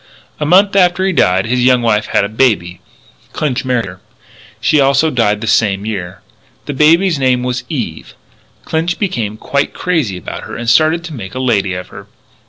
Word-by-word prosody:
A 150 - -1
month 195 +4 +4
after 185 -1 +3
he 190 - +1
died 95 - +2
his 125 +2 0
young 125 -1 +3
wife 105 -2 +1
had - - +1
a - - 0
baby. 105 -6 0 0.5
Clinch 140 -5 -2
married 125 -3 0
her. 90 -1 -11 0.6
She 155 - +2
also 140 +3 +3
died 105 -5 +1
the - - -3
same 105 -2 +1
year. 95 -4 -5 0.4
The 145 - -4
baby's 165 +3 +3
name 130 -2 +1
was 125 0 -2
Eve. 115 - -5 0.5
Clinch 165 +2 -1
became 115 - -3
quite 140 +5 -2
crazy 155 - -1
about 90 - -7
her - - -8
and 120 - -6
started 155 +7 +3
to 170 -2 -8
make 110 -5 -8
a - - -3
lady 100 -7 0
of 90 0 -7
her. - - -12
125 Hz, 190 wpm, -15 LUFS, 105-155 Hz, 0.6 s, month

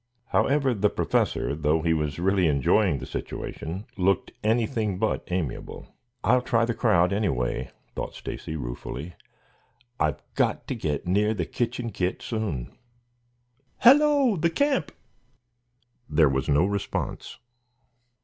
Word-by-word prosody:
However, 140 -2 +2
the 105 -1 +2
Professor, - - 0
though 75 +1 +1
he 85 -1 +3
was 75 -2 -1
really 95 0 +2
enjoying 75 - +3
the 65 - -6
situation, 90 +10 -5
looked 95 +1 +1
anything 110 -2 +1
but 110 +2 0
amiable. 90 -8 -4 0.3
"I'll 125 +2 +4
try 115 -2 +2
the 120 - -1
crowd, 100 -6 +3
anyway," 65 - -1 0.2
thought - - -5
Stacy, 80 - -6
ruefully. 70 +4 -6 0.9
"I've 75 -3 0
got - - 0
to - - 0
get 75 -2 -2
near 105 +4 +2
the 85 -5 -1
kitchen 120 +2 -2
kit 90 -1 -2
soon. 105 - -3 1.0
Hello, 280 -3 +5
the 170 +1 +2
camp!" 270 - +1 1.2
There 75 -4 +4
was 65 +2 -1
no 75 +5 +4
response. 100 0 -3
95 Hz, 125 wpm, -26 LUFS, 80-115 Hz, 1.2 s, Hello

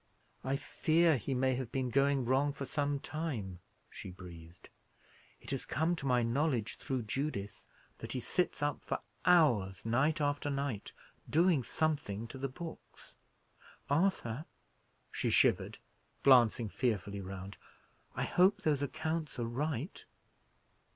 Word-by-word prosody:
"I 135 +1 0
fear 160 +3 +3
he 130 +2 -2
may 130 +1 +2
have 125 -2 -3
been 130 -2 -1
going 140 0 +3
wrong 135 +3 +2
for 140 0 -5
some 145 0 -1
time," 125 - -4 0.3
she - - -8
breathed. 85 -2 -12 0.7
"It - - -6
has 135 - -2
come 160 +5 0
to 140 - -3
my 125 -2 +3
knowledge, 120 -1 0
through 130 -3 -2
Judith, 110 -3 -4 0.3
that - - -6
he 130 - -1
sits 180 +3 0
up 145 -1 -1
for - - -1 0.3
hours 120 - +4
night 130 +8 +2
after 145 0 0
night, 140 -7 -2 0.4
doing 165 -1 +4
something 120 -7 -1
to 135 - -8
the 135 +1 -2
books. 165 +5 -10 0.8
Arthur," 150 -5 +1 0.7
she - - -1
shivered, - - +3 0.5
glancing 120 -4 +6
fearfully 100 -3 -1
round, 95 +1 -7 0.6
"I - - -1
hope 200 +3 +3
those 150 -3 +2
accounts 155 +2 -2
are 120 - -1
right?" 145 - -3
135 Hz, 135 wpm, -33 LUFS, 115-150 Hz, 0.8 s, glancing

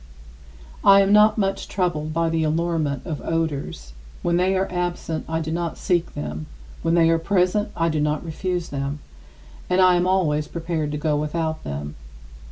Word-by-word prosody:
I 200 0 +8
am 195 +1 +3
not 210 +1 +6
much 195 -2 -1
troubled 175 -5 -1
by 165 +1 +1
the 160 0 0
allurement 155 -3 -1
of 160 -5 -4
odors. 150 - -3 0.3
When 170 0 +2
they 190 +2 +2
are 190 - 0
absent, 175 -3 -3
I 160 0 -1
do 160 0 -4
not 170 -1 -2
seek 175 -2 0
them; 75 +1 -5 0.3
when 165 +1 +1
they 165 -1 +5
are 165 - +2
present, 185 +4 +1
I 165 - +2
do 155 -2 0
not 150 +2 0
refuse 175 +1 -3
them; 140 +1 -3 0.7
and 180 - +2
I 185 -1 +6
am 175 0 +2
always 155 -6 +1
prepared 165 -3 -3
to - - -1
go 150 0 0
without 155 +1 -2
them. 75 +1 -5
165 Hz, 175 wpm, -23 LUFS, 150-180 Hz, 0.7 s, I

